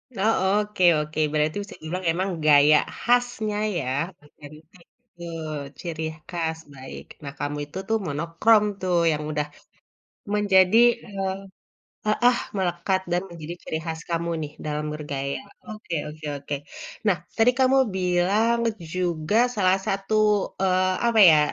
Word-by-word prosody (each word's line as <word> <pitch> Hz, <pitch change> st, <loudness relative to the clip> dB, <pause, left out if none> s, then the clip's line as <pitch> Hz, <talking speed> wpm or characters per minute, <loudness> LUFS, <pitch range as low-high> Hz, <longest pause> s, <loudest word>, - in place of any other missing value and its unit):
Oh, 215 Hz, +3 st, +2 dB, 0.3 s
oke 210 Hz, -3 st, -3 dB, 0.2 s
oke. 150 Hz, +1 st, -4 dB
Berarti 155 Hz, 0 st, +1 dB
bisa 200 Hz, -, -11 dB
dibilang 180 Hz, +4 st, -4 dB
emang 185 Hz, +4 st, -1 dB, 0.2 s
gaya 150 Hz, 0 st, +7 dB, 0.2 s
khasnya 240 Hz, -4 st, +1 dB, 0.2 s
ya, 145 Hz, -, -2 dB, 0.4 s
otentik, 155 Hz, +4 st, -16 dB, 0.2 s
betul, 165 Hz, -7 st, -7 dB, 0.3 s
ciri 160 Hz, -2 st, -4 dB, 0.3 s
khas, 165 Hz, -2 st, -2 dB, 0.2 s
baik. 130 Hz, -1 st, -9 dB, 0.2 s
Nah, 140 Hz, -, -6 dB
kamu 145 Hz, 0 st, -3 dB
itu 150 Hz, -, -9 dB
tuh 225 Hz, -, +2 dB
monokrom 170 Hz, +9 st, +3 dB, 0.2 s
tuh 185 Hz, -1 st, 0 dB, 0.2 s
yang 150 Hz, 0 st, -2 dB
udah, 150 Hz, 0 st, -1 dB, 0.9 s
menjadi, 200 Hz, 0 st, +4 dB, 0.3 s
eee 195 Hz, -3 st, -3 dB, 0.7 s
heeh, 240 Hz, +3 st, +3 dB, 0.2 s
melekat 185 Hz, +1 st, 0 dB
dan 175 Hz, -, +1 dB
menjadi 170 Hz, 0 st, -7 dB
ciri 160 Hz, -, -3 dB
khas 160 Hz, -1 st, -4 dB
kamu 170 Hz, 0 st, -1 dB
nih, 150 Hz, -, -6 dB
dalam 150 Hz, 0 st, -2 dB
bergaya. 140 Hz, -2 st, -4 dB, 0.3 s
Oke 215 Hz, -5 st, -6 dB
oke 155 Hz, +1 st, -11 dB
oke. 140 Hz, +1 st, -5 dB, 0.5 s
Nah, 195 Hz, -, +4 dB, 0.2 s
tadi 225 Hz, +2 st, +5 dB
kamu 265 Hz, 0 st, +4 dB, 0.2 s
bilang 190 Hz, +6 st, +2 dB, 0.3 s
juga 175 Hz, 0 st, -1 dB, 0.2 s
salah 185 Hz, -1 st, +3 dB
satu, 195 Hz, +2 st, -1 dB, 0.5 s
eee, 185 Hz, 0 st, +2 dB
apa 230 Hz, -2 st, +2 dB
ya, 155 Hz, -, +6 dB
175 Hz, 135 wpm, -24 LUFS, 155-200 Hz, 0.9 s, gaya